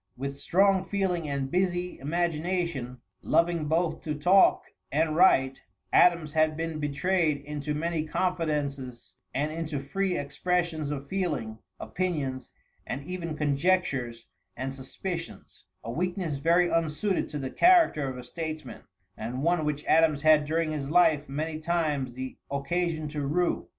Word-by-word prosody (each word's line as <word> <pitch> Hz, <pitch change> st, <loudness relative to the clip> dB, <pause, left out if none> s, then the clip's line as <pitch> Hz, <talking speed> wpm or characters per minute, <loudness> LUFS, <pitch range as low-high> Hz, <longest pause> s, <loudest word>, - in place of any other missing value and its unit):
With 140 Hz, +2 st, -5 dB
strong 195 Hz, +1 st, +3 dB
feeling 180 Hz, -6 st, -1 dB
and 135 Hz, -1 st, -2 dB
busy 180 Hz, -1 st, 0 dB
imagination, 165 Hz, -4 st, -2 dB, 0.2 s
loving 170 Hz, -2 st, +2 dB
both 165 Hz, +2 st, 0 dB
to 150 Hz, -1 st, -3 dB
talk 180 Hz, +6 st, +5 dB, 0.3 s
and 155 Hz, +1 st, +1 dB
write, 135 Hz, -7 st, +4 dB, 0.3 s
Adams 170 Hz, -4 st, +4 dB
had 155 Hz, -1 st, +2 dB
been 165 Hz, -1 st, -3 dB
betrayed 155 Hz, +2 st, +1 dB
into 150 Hz, 0 st, -3 dB
many 160 Hz, 0 st, -2 dB
confidences 150 Hz, -9 st, -2 dB, 0.2 s
and 150 Hz, +3 st, -1 dB
into 160 Hz, -2 st, -3 dB
free 180 Hz, +7 st, -1 dB
expressions 165 Hz, 0 st, -1 dB
of 140 Hz, -1 st, -5 dB
feeling, 145 Hz, -, -2 dB, 0.2 s
opinions, 145 Hz, -9 st, -3 dB, 0.4 s
and 135 Hz, +2 st, -4 dB
even 170 Hz, -2 st, -5 dB
conjectures 140 Hz, -6 st, 0 dB, 0.3 s
and 130 Hz, +2 st, -3 dB
suspicions 165 Hz, -, -7 dB, 0.2 s
a 115 Hz, -, -5 dB
weakness 175 Hz, -, -2 dB
very 170 Hz, +4 st, +4 dB
unsuited 165 Hz, +4 st, 0 dB
to 150 Hz, -, -5 dB
the 135 Hz, -2 st, -4 dB
character 335 Hz, -, +4 dB
of 130 Hz, -, -6 dB
a 125 Hz, -, -7 dB
statesman, 155 Hz, -1 st, -6 dB, 0.3 s
and 120 Hz, +5 st, -4 dB
one 170 Hz, -1 st, +2 dB
which 150 Hz, 0 st, -2 dB
Adams 155 Hz, -2 st, +3 dB
had 155 Hz, -1 st, +5 dB
during 160 Hz, +1 st, 0 dB
his 140 Hz, -3 st, -3 dB
life 155 Hz, -4 st, +3 dB
many 155 Hz, +3 st, -3 dB
times 155 Hz, -6 st, -1 dB
the 130 Hz, +1 st, -7 dB
occasion 155 Hz, +3 st, -1 dB
to 150 Hz, 0 st, -4 dB
rue. 165 Hz, +6 st, 0 dB
155 Hz, 140 wpm, -28 LUFS, 140-175 Hz, 0.4 s, talk